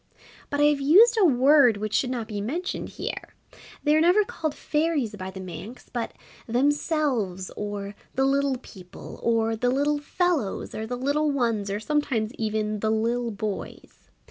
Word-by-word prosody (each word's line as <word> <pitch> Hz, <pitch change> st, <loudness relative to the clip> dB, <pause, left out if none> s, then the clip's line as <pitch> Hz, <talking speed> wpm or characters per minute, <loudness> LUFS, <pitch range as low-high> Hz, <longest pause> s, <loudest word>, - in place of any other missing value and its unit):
But 285 Hz, -, -2 dB
I -, -, +4 dB
have 295 Hz, -1 st, +3 dB
used 410 Hz, -, +6 dB
a -, -, +6 dB
word 270 Hz, -, +5 dB
which 215 Hz, +1 st, -4 dB
should 255 Hz, -, +2 dB
not 240 Hz, -4 st, -3 dB
be 205 Hz, -2 st, -4 dB
mentioned 325 Hz, -, -3 dB
here -, -, -6 dB, 0.5 s
they 300 Hz, 0 st, +4 dB
are 310 Hz, -, +4 dB
never 360 Hz, +6 st, +5 dB
called 310 Hz, -6 st, -3 dB
Fairies 300 Hz, -8 st, 0 dB
by 190 Hz, -1 st, -6 dB
the 190 Hz, 0 st, -9 dB
Manx, 185 Hz, +6 st, -9 dB
but 235 Hz, -2 st, -3 dB, 0.3 s
Themselves, 250 Hz, -, 0 dB
or 205 Hz, -1 st, -5 dB, 0.2 s
the 265 Hz, 0 st, +2 dB
Little 275 Hz, -1 st, +2 dB
People, 190 Hz, -6 st, -12 dB
or 225 Hz, -1 st, +1 dB
the 245 Hz, +3 st, 0 dB
Little 290 Hz, +3 st, +1 dB
Fellows, 300 Hz, -, -1 dB
or 220 Hz, 0 st, -4 dB
the 245 Hz, +1 st, -3 dB
Little 285 Hz, +4 st, +1 dB
Ones, 230 Hz, -7 st, 0 dB
or 200 Hz, +1 st, -2 dB
sometimes 240 Hz, -4 st, -1 dB
even 215 Hz, -2 st, -2 dB
the 220 Hz, -, 0 dB
Lil' 230 Hz, +2 st, 0 dB
Boys. 210 Hz, -1 st, -6 dB
245 Hz, 170 wpm, -25 LUFS, 215-290 Hz, 0.5 s, used